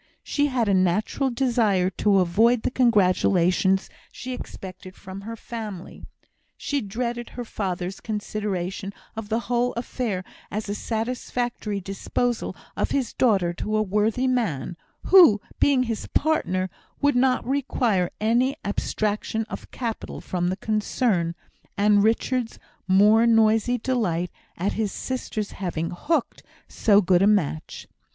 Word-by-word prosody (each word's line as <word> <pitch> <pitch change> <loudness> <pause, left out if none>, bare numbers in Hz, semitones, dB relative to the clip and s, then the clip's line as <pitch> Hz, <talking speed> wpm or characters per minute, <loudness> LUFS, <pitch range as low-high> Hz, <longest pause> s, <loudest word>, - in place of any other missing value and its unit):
She 290 0 +1
had 250 -5 0
a 200 - +3
natural 190 +8 +1
desire 230 -7 +1
to 200 +1 +2
avoid 220 +7 +3
the - - 0
congratulations 190 -5 +3 0.2
she 255 +1 -6
expected 185 -5 -9
from 190 0 -9
her 225 +3 -6
family. 215 -5 -8 0.5
She 285 -1 -2
dreaded 235 +3 -3
her 245 - -6
father's 185 -3 -4
consideration 200 -3 -3 0.2
of 220 -2 -6
the 225 +1 0
whole 245 +1 0
affair 230 -5 -3 0.3
as 215 +1 -4
a 200 - -2
satisfactory 230 -1 -3
disposal 195 +5 -2 0.2
of - - 0
his 265 -4 -1
daughter 195 -8 +2
to 215 +5 -2
a 215 - +2
worthy 210 +5 +1
man, 200 - -1 0.3
who, 345 - +7 0.2
being 275 -3 +4
his 230 -3 -4
partner, 185 - 0 0.3
would 285 -1 +2
not 255 0 +2
require 245 -9 +1
any 240 +5 +2
abstraction 215 +2 -1
of - - -7
capital 230 -3 -5
from 175 -1 -2
the 185 +1 -1
concern, 210 -4 0 0.4
and 205 0 +4
Richard's 230 +2 0 0.3
more 210 +5 +5
noisy 225 +1 +4
delight 200 -9 -1 0.3
at 190 +4 -1
his 215 -2 -1
sister's 225 -5 -4
having 170 -4 -3
"hooked" 290 - -1 0.3
so 205 -2 +4
good 180 -1 +4
a 195 - +5
match. 170 -7 0
215 Hz, 130 wpm, -24 LUFS, 190-240 Hz, 0.5 s, who